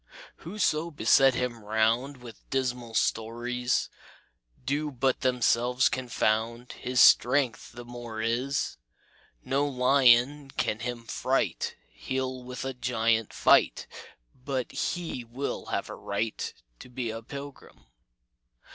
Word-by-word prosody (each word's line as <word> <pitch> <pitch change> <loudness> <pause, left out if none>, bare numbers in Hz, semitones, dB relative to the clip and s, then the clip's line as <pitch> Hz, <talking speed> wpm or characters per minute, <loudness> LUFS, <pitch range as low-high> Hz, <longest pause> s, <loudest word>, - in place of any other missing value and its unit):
"Whoso 170 -5 -1
beset 135 -4 +4
him 120 -3 -3
round 110 +6 +1
With 120 -2 -13
dismal 125 -3 -2
stories, 120 +3 0 0.8
Do 145 +3 -1
but 130 -1 0
themselves 125 0 +2
confound 115 -1 -1
His 125 0 -2
strength 125 +1 +4
the 120 0 -9
more 120 -2 -7
is. 125 +5 -1 0.7
No 140 +2 +1
lion 135 +1 +4
can 110 - 0
him 120 0 -5
fright; - - -1 0.2
He'll 130 -1 -3
with 125 +1 -6
a 135 - -3
giant 115 -3 0
fight, - - +3 0.6
But 130 -2 -2
he 170 -8 -3
will 120 +4 -5
have - - -2
a - - -7
right 105 +2 -3 0.3
To - - -12
be 125 -2 -3
a 115 +1 -6
pilgrim. 140 +4 -10
125 Hz, 115 wpm, -28 LUFS, 115-135 Hz, 0.8 s, beset